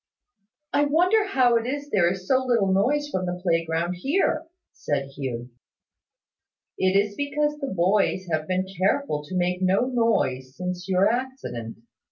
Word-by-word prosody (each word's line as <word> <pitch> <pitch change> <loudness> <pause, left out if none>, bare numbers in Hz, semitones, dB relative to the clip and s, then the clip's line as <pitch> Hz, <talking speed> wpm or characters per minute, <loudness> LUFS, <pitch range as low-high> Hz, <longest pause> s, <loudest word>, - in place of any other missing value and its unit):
"I 290 - +3
wonder 365 +8 +3
how 250 -9 +3
it 230 +1 -2
is 285 +2 -4
there 175 -3 +3
is 185 0 -6
so 260 -1 +3
little 230 -7 +2
noise 290 +10 +2
from 185 -1 -2
the 180 0 -3
playground 165 0 0
here," 315 - 0 0.3
said 140 -2 -2
Hugh. 130 -3 -5 1.3
"It 190 0 +2
is 205 +1 +1
because 295 +4 -1
the 275 - -3
boys 190 +1 +1
have 155 -1 -1
been 185 0 0
careful 190 - +1
to 180 +5 -5
make 180 +1 0
no 190 +1 +3
noise 225 - 0
since 180 +1 -4
your 190 +1 +4
accident. 230 - -4
190 Hz, 155 wpm, -25 LUFS, 175-265 Hz, 1.3 s, your